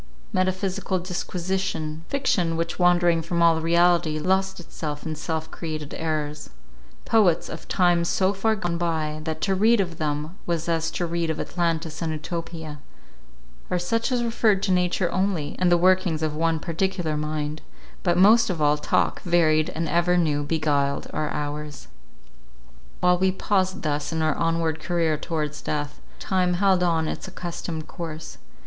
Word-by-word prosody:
Metaphysical 185 +1 0
disquisition; 175 -3 -3
fiction, 180 -12 +1
which 165 +2 -3
wandering 175 -1 +4
from 170 +1 0
all 165 -1 +4
reality, 170 -1 +3
lost 190 +4 0
itself 150 -3 -6
in 160 - -2
self 160 +1 -4
created 155 -3 -5
errors; 150 -2 -3 0.6
poets 195 -7 +3
of - - -8
times 175 -2 +2
so 190 +1 +2
far 220 +3 +1
gone 175 -4 -2
by, 155 -3 -1
that 160 -1 -3
to 195 - +1
read 220 +4 +4
of 175 -4 -2
them 150 +2 -2
was 170 -1 -1
as 165 -1 0
to 175 - -2
read 170 -1 -1
of 160 - -2
Atlantis 165 -2 -2
and 165 -1 -1
Utopia; 160 -1 -5 0.9
or 180 - +1
such 225 +8 -1
as 245 -1 +1
referred 220 -4 +2
to 195 - +1
nature 180 0 +1
only, 185 -6 -1
and 180 -1 +3
the 175 - +6
workings 180 -3 +2
of 155 -1 -1
one 165 +1 +1
particular 170 0 -1
mind; 150 0 -3 0.4
but 175 -1 +1
most 210 +5 +6
of 180 -4 -2
all, 150 0 +3
talk, - - +1
varied 155 -3 +3
and 165 +1 -3
ever 175 +2 +2
new, 150 -4 +1
beguiled 145 -2 0
our 155 -1 -1
hours. 150 0 -5 1.1
While 180 0 +4
we 190 0 +3
paused 190 -1 0
thus 145 0 -1
in 160 -1 -1
our 155 -1 +2
onward 165 -1 0
career 165 -1 0
towards 150 -1 -3
death, 145 -1 -3 0.2
time 185 -3 +1
held 190 0 +3
on 165 -3 +1
its - - -5
accustomed 170 -3 -5
course. 160 -2 -7
170 Hz, 160 wpm, -24 LUFS, 155-185 Hz, 1.1 s, the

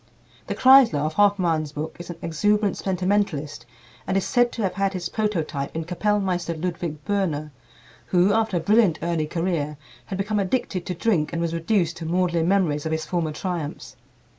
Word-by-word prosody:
The - - -3
Kreisler 260 - +7
of 155 - -2
Hoffmann's 175 -7 +2
book 155 +2 -5
is 175 - -9
an 175 - -5
exuberant 205 +5 +1
sentimentalist, 180 - -1 0.4
and 190 - +1
is 195 - 0
said 245 -2 +2
to 230 - -3
have 190 - 0
had 195 0 0
his 175 -2 -3
prototype 165 -11 -2
in 165 0 -3
Kapellmeister 180 -2 -1
Ludwig 165 -3 -4
Böhner, 160 -7 -1 0.6
who, 185 +2 +3
after 220 -4 +1
a - - -1
brilliant 205 -3 +3
early 165 -2 0
career, 165 -3 -2 0.3
had 190 - -4
become 205 +2 -1
addicted 190 -3 -1
to 180 - -2
drink 165 -5 +1
and 165 - -1
was 170 -1 -1
reduced 170 0 0
to 165 - -6
maudlin 170 -1 +1
memories 165 -6 +1
of - - -3
his 160 0 -2
former 170 -3 -1
triumphs. 155 -4 -5
175 Hz, 175 wpm, -24 LUFS, 160-200 Hz, 0.6 s, Kreisler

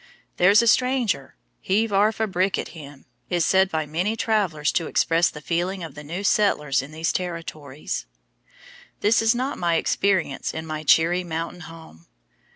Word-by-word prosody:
"There's 200 +5 +5
a - - 0
stranger! 240 - +1 0.2
Heave 210 +3 0
arf 210 +3 +2
a 220 - +2
brick 190 -1 0
at - - -4
him!" 145 -4 -12 0.2
is 175 -2 +1
said 190 0 +3
by 160 -2 -2
many 175 +9 -1
travelers 190 -10 0
to 165 -3 -1
express 165 +1 +2
the 150 - -10
feeling 175 +3 -2
of 160 -4 -8
the 150 - -10
new 170 +7 -5
settlers 150 -10 +2
in 135 +3 -10
these 160 +1 -1
Territories. 155 - -5 0.9
This 215 +2 +3
is 225 +1 +3
not 260 +4 -3
my 170 -1 +1
experience 175 -4 0
in 160 - -5
my 155 -1 -5
cheery 165 +4 +3
mountain 165 +1 -5
home. 160 - -13
175 Hz, 165 wpm, -23 LUFS, 155-200 Hz, 0.9 s, There's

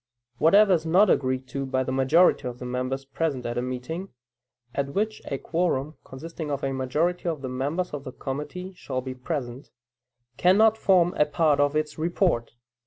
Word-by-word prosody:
Whatever 195 +4 +6
is 165 -3 +1
not 180 +5 +4
agreed 130 -1 0
to 135 0 -3
by 130 -1 0
the 130 - -3
majority 135 +2 +3
of 120 -1 -6
the 125 - -8
members 130 +2 -3
present 140 -2 -2
at 120 - -3
a 120 - 0
meeting 130 +9 -5 0.6
(at 140 0 -3
which 215 +2 -1
a 135 - -3
quorum, 155 -3 -1
consisting 160 +3 -7
of 140 -1 -3
a 135 0 -1
majority 155 +7 0
of 155 -4 -4
the 130 - -3
members 145 +8 -2
of 145 -2 -5
the 130 - -7
committee, 150 +9 -6
shall 130 -7 -4
be 130 0 -5
present) 130 -1 -5 0.7
cannot 215 +5 +5
form 180 -5 +3
a 150 - +6
part 150 -1 +2
of 145 +1 +2
its 155 0 -2
report. 165 - 0
145 Hz, 180 wpm, -26 LUFS, 130-175 Hz, 0.7 s, Whatever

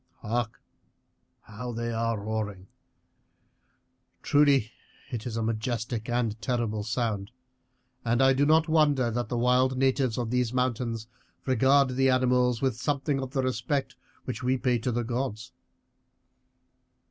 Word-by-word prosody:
Hark, 115 +1 -2 0.8
how 120 +4 -7
they 115 +1 -3
are 115 -1 -1
roaring! 105 -2 -4 1.6
Truly 140 -6 +3 0.4
it 120 -1 -4
is 115 -2 -4
a 115 - -1
majestic 115 0 -2
and 115 -2 -1
terrible 110 -2 -1
sound, 110 -3 -2 0.7
and 120 +1 +1
I 135 0 +5
do 135 +2 +2
not 160 +1 +4
wonder 145 -6 +3
that 120 +1 -2
the 120 - -1
wild 125 +2 +3
natives 130 -2 +1
of 120 -2 -2
these 125 -1 0
mountains 120 -3 -1 0.4
regard 135 +2 +4
the 135 +1 +2
animals 125 -1 +2
with 130 -4 +1
something 140 -1 0
of 130 0 -6
the 135 -2 0
respect 130 +2 -1 0.3
which 125 - -4
we 130 +1 +1
pay 125 -2 +1
to 125 +3 -1
the 120 +1 -1
gods. 120 -1 -3
125 Hz, 135 wpm, -27 LUFS, 115-130 Hz, 1.6 s, I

